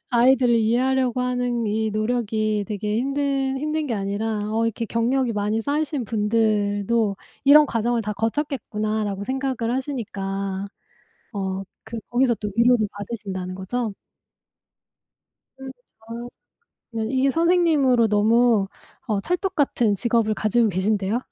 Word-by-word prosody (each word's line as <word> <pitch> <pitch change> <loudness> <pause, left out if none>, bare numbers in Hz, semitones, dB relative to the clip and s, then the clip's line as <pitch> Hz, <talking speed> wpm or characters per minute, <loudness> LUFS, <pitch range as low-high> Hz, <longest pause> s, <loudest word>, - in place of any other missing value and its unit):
아이들을 245 0 +4
이해하려고 250 +2 +1
하는 245 -2 -1
이 220 +1 0
노력이 215 -1 0
되게 210 +1 -2
힘든 275 0 0
힘든 305 +1 -2
게 235 - -1
아니라 205 +2 -2
어 225 +1 +1
'이렇게 230 0 -2
경력이 240 +2 0
많이 210 +1 0
쌓이신 285 0 -1
분들도 210 -1 +1 0.3
이런 295 +2 +8
과정을 235 -1 0
다 210 0 -3
거쳤겠구나.'라고 215 -4 -2
생각을 260 -2 -2
하시니까 200 -7 -3 0.7
어 195 -1 -3 0.3
그 230 - -4
거기서 245 0 +3
또 210 -2 -5
위로를 235 -2 +4
받으신다는 195 -3 -5
거죠? 210 +3 -3 1.7
음 265 -1 -7 0.4
어. 235 +1 -6 0.6
네. 225 -1 -3
이게 265 +1 +2
선생님으로 315 -8 +3
너무 220 0 +3 0.4
어 210 -4 0
찰떡같은 315 - 0
직업을 230 0 +1
가지고 215 +2 +2
계신데요? 200 +3 0
230 Hz, 290 characters per minute, -23 LUFS, 210-260 Hz, 1.7 s, 이런